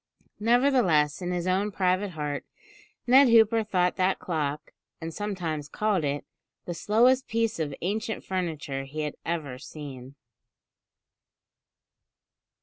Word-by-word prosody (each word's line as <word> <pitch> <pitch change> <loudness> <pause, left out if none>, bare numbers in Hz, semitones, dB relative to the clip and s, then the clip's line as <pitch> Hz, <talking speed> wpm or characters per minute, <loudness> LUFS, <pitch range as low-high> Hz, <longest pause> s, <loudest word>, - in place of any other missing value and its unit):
Nevertheless, 220 - +3
in 180 - -3
his 175 -1 -2
own 190 +3 +1
private 190 +1 +1
heart, 150 -2 -3 0.6
Ned 265 +3 +7
Hooper 225 -1 +5
thought 180 -4 +1
that 185 +1 +2
clock 150 -4 -3 0.3
and 165 0 -6
sometimes 170 -8 -3
called 210 -3 0
it 145 0 -2 0.4
"the 175 - -3
slowest 245 +9 +3
piece 225 -3 0
of 145 -3 -2
ancient 215 +4 -2
furniture 155 -7 -3
he 150 +3 -5
had 150 -1 -3
ever 150 -7 -3
seen." 140 -3 -9
180 Hz, 120 wpm, -27 LUFS, 150-210 Hz, 0.6 s, Ned